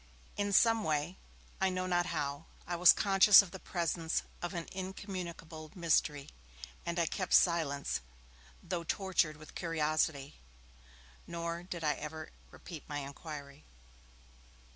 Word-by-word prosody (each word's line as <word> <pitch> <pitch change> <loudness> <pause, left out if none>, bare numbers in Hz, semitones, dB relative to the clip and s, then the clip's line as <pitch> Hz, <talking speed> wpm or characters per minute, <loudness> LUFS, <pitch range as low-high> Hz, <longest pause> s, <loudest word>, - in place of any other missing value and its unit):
In 205 0 -1
some 225 +3 +5
way, 155 +3 -1 0.4
I 190 - +4
know 185 0 -2
not 175 -1 +1
how, 145 -2 -3 0.2
I 175 - -3
was 175 0 +8
conscious 200 0 +7
of 185 - -11
the 190 - -8
presence 170 -2 -1 0.2
of 175 +2 -4
an 170 -1 -4
incommunicable 185 -4 -6
mystery, 155 -4 +1 0.6
and 170 0 -2
I 170 - +3
kept 185 +3 0
silence, 155 - +2 0.6
though 175 -3 -3
tortured 175 -4 0
with 155 0 -13
curiosity, 155 -4 -1 0.9
nor 170 0 -4
did 175 -2 -6
I 150 -1 +3
ever 155 +2 -7 0.2
repeat 165 -5 -10
my 145 - -3
inquiry. 140 0 -8
170 Hz, 130 wpm, -33 LUFS, 155-185 Hz, 0.9 s, was